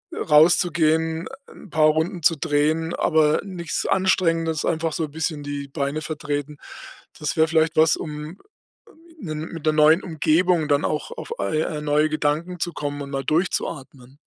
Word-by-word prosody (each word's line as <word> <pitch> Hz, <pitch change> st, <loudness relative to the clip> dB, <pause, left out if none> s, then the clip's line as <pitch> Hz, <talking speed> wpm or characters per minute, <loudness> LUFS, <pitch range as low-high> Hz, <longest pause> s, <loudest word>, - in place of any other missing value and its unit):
rauszugehen, 160 Hz, 0 st, +3 dB, 0.3 s
'n 210 Hz, -, -14 dB
paar 155 Hz, -1 st, +4 dB
Runden 165 Hz, +3 st, -1 dB
zu 165 Hz, +1 st, +4 dB
drehen, 155 Hz, +2 st, 0 dB
aber 155 Hz, -1 st, +2 dB
nix 180 Hz, -5 st, -4 dB
Anstrengendes, 165 Hz, -4 st, +1 dB
einfach 160 Hz, -1 st, -1 dB
so 160 Hz, -1 st, -2 dB
bisschen 155 Hz, 0 st, -3 dB
die 145 Hz, -1 st, -5 dB
Beine 140 Hz, +1 st, -2 dB
vertreten. 150 Hz, -1 st, -4 dB, 0.6 s
Das 150 Hz, -2 st, -2 dB
wäre 160 Hz, 0 st, +4 dB
vielleicht 160 Hz, 0 st, +2 dB
was, 160 Hz, 0 st, +4 dB
um 150 Hz, +3 st, -7 dB, 0.8 s
'nen 155 Hz, -, -5 dB
mit 165 Hz, -3 st, -8 dB
'ner 155 Hz, -, +4 dB
neuen 155 Hz, +3 st, +5 dB
Umgebung 165 Hz, 0 st, +1 dB
dann 145 Hz, 0 st, +2 dB
auch 150 Hz, -, -2 dB
auf, -, -, -7 dB
äh, 155 Hz, -, 0 dB
äh, 150 Hz, -1 st, -3 dB
neue 150 Hz, +1 st, +2 dB
Gedanken 155 Hz, +4 st, -1 dB
zu 175 Hz, -, -2 dB
kommen 145 Hz, -1 st, -4 dB
und 140 Hz, -, -8 dB
mal 135 Hz, -1 st, -3 dB
durchzuatmen. 140 Hz, -4 st, -3 dB
155 Hz, 155 wpm, -23 LUFS, 150-165 Hz, 0.8 s, neuen